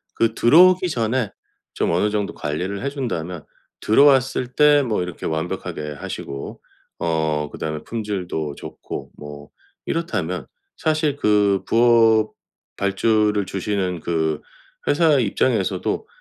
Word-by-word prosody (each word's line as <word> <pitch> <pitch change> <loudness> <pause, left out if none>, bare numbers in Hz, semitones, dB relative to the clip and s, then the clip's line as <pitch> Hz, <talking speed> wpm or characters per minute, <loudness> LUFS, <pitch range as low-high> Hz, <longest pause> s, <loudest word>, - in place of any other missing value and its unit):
그 115 -1 +1
들어오기 180 +10 +5
전에 120 - 0 0.5
좀 - - 0
어느 90 +5 +2
정도 105 -1 -2
관리를 90 +7 -3
해 140 - 0
준다면 90 - -4 0.3
들어왔을 135 +1 +4
때 150 -1 +6
뭐 110 -8 -1
이렇게 90 -1 -6
완벽하게 80 -2 -4
하시고, 70 0 -6 0.4
어 80 -3 -1
그다음에 75 -1 -5
품질도 95 -9 -4
좋고 - - -8
뭐 75 0 -10 0.4
이렇다면 90 - -2 0.3
사실 155 -2 0
그 105 -5 +2
부업 115 -2 +4 0.4
발주를 105 +1 +1
주시는 95 -2 -2
그 80 -2 -1 0.5
회사 155 -2 +4
입장에서도 110 -2 0
105 Hz, 255 characters per minute, -21 LUFS, 85-125 Hz, 0.5 s, 때